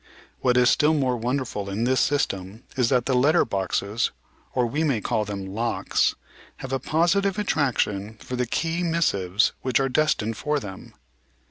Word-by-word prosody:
"What 125 -1 +2
is 125 0 +5
still 155 +2 +3
more 130 -4 +1
wonderful 120 -4 -2
in 100 +4 -2
this 130 +2 +2
system 105 -6 -1
is 125 -3 +2
that 125 -3 +2
the 135 - +1
letter 145 +7 +4
boxes, 100 +2 -1 0.5
or 125 -2 +2
we 145 +7 -1
may 140 -8 +1
call 110 0 -1
them 100 -1 -5
locks, 115 +2 0 0.4
have 130 0 -6
a 135 - +1
positive 180 +7 +1
attraction 110 - 0
for 125 - -6
the 125 -1 -1
key 165 +7 -1
mis 170 -1 +2
sives 95 +1 +1
which 130 0 +1
are 135 0 +1
destined 120 -7 +1
for 150 0 0
them." 95 -6 -10
125 Hz, 170 wpm, -24 LUFS, 105-145 Hz, 0.5 s, is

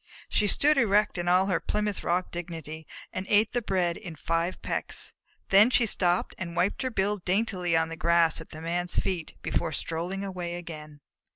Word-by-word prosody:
She 210 - +2
stood 295 +7 +4
erect 210 -4 +2
in 175 - -3
all 180 +2 +4
her 185 -4 +1
Plymouth 210 -1 -2
Rock 180 +1 0
dignity, 160 -3 -6 0.3
and 185 +1 -4
ate 210 +1 +4
the 245 - 0
bread 180 -5 0
in 170 - -8
five 165 +3 -1
pecks. - - -4 0.4
Then 205 +4 +7
she 245 -2 +4
stooped 180 -4 +1
and 170 -2 -5
wiped 190 +4 +1
her 260 - 0
bill 210 -2 0
daintily 185 -3 0
on 160 0 +1
the 165 - -5
grass 170 -1 +3
at - - -12
the 155 - -9
Man's 175 +1 -2
feet 175 -4 -2
before - - -1
strolling 170 +6 -3
away 180 -3 -4
again. 155 -4 -9
180 Hz, 185 wpm, -28 LUFS, 170-200 Hz, 0.4 s, Then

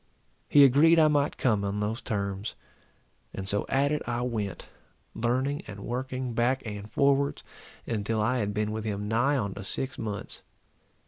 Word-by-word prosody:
He 145 - +8
agreed 145 +5 +6
I 155 -1 +6
might 145 -1 +1
come 110 -5 +2
on 100 +1 -2
those 110 +4 -2
terms; 100 -2 -3 0.8
and 95 0 -5
so 100 +1 -1
at 140 +2 +2
it 150 - 0
I 120 0 -1
went, 110 -7 -3 0.5
learning 130 +5 0
and 100 -1 -8
working 130 +1 -3
back 120 +3 +1
and 105 -1 -6
forwards, 140 0 +2 0.4
until 110 0 -1
I 125 +4 +1
had 105 -2 -1
been 105 +1 -1
with 110 0 -3
him 105 -1 -3
nigh 120 +6 +2
on 100 -6 -2
to 100 - -7
six 135 +8 -3
months. 105 -3 -5
115 Hz, 170 wpm, -28 LUFS, 105-135 Hz, 0.8 s, He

